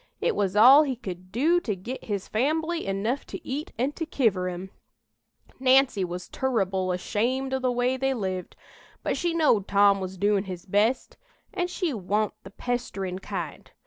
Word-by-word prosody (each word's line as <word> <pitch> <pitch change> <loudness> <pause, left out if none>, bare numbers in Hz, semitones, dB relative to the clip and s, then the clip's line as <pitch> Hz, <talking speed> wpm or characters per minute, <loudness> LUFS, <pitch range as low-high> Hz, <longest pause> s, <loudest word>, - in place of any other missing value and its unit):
It - - 0
was 200 -1 0
all 255 +7 +9
he 275 -4 0
could 185 -6 -8
do 315 +10 +3
to 220 - -3
git 235 +8 -7
his 200 -3 -3
fambly 315 +6 0
enough 215 +8 -1
to - - -8
eat 290 +4 -4
and 265 +5 -1
to 325 - -3
kiver 200 - +1
'em. 180 +2 -7 0.9
Nancy 260 -5 +4
was 180 0 -5
turrible 195 -8 0
ashamed 240 +9 -1
o' 265 - +1
the 255 -1 +1
way 245 +1 +1
they 270 0 0
lived, 185 -5 -4 0.5
but - - 0
she 345 -2 -1
knowed 255 - +3
Tom 200 0 +4
was 190 0 -5
doin' 205 +1 +2
his 180 -2 -7
best, 210 +6 +1 0.4
an' 355 -2 -1
she 355 -3 -2
wa'n't 210 0 -1
the 195 - -10
pesterin' 195 -5 -3
kind. - - -6
220 Hz, 175 wpm, -26 LUFS, 190-265 Hz, 0.9 s, all